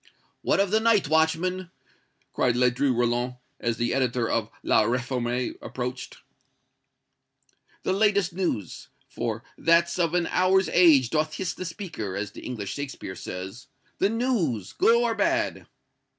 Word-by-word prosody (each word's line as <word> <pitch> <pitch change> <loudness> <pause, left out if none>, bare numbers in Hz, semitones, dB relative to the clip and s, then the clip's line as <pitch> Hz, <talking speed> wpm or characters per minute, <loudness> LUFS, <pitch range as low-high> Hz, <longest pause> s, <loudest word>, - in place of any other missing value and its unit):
"What - - +1
of 195 -1 +2
the 220 - +4
night, 220 -7 +3
watchman?" 165 +4 +1 0.6
cried 125 -2 +1
Ledru 125 +2 +2
Rollin, 120 +1 0 0.2
as 115 -1 -1
the 120 0 0
editor 125 -3 0
of 110 -2 -1
"La - - +4
Réforme" 125 +1 -1
approached. 125 0 -5 1.7
"The - - +1
latest 200 -3 +2
news! 170 - -3 0.2
for - - -4 0.2
'That 170 +1 +3
of 170 -1 +1
an 175 -1 +2
hour's 190 +1 +3
age 150 -9 +5
doth 155 0 0
hiss 190 - -2
the 185 - -6
speaker,' 165 - -5
as 100 0 -3
the - - -11
English 105 -6 -5
Shakespeare 140 -9 -6
says. 95 +10 -7 0.3
The 195 - +3
news! 210 - -1
good 230 - +4
or 235 -1 +2
bad!" 335 +7 0
150 Hz, 140 wpm, -26 LUFS, 120-185 Hz, 1.7 s, age